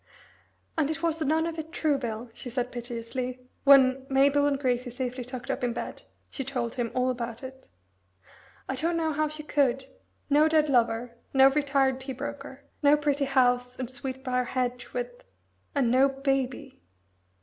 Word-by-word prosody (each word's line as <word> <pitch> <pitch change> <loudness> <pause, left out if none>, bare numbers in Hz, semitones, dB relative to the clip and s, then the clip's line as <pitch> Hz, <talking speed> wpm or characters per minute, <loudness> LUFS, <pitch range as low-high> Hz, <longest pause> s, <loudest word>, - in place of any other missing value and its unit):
"And 300 -2 +2
it 315 +1 -3
was 325 -1 0
none 315 +2 +2
of 330 -1 -4
it 315 +1 -6
true, 305 -4 +1
Bill," 230 -1 -5
she 245 - -8
said 250 0 -2
piteously, 245 +1 -4 0.3
when, 270 -1 +6
Mabel 280 +2 +4
and 285 -1 +1
Gracie 250 -2 0
safely 250 0 -4
tucked 250 0 -5
up - - -3
in 240 -1 +1
bed, 240 - -6 0.3
she 270 - -3
told 245 -3 -3
him 240 -2 -2
all 255 0 +2
about 235 0 -5
it. 265 0 -10 1.0
"I - - -2
don't 330 +5 0
know 320 -1 0
how 305 +1 +1
she 305 0 -7
could. 270 -3 +1 0.4
No 295 +2 +5
dead 310 -2 +3
lover 235 -1 +1 0.2
no 270 0 +8
retired 275 -2 +2
tea 265 0 -5
broker 280 +1 -7 0.2
no 290 +1 +6
pretty 290 -1 +1
house, 250 -2 +2
and 255 -1 -4
sweet 265 0 -6
brier 250 -1 0
hedge 250 -1 -2
with... - - -5 0.5
and 255 -5 +2
no 265 +2 +5
Baby." 270 - -2
265 Hz, 170 wpm, -27 LUFS, 250-285 Hz, 1.0 s, no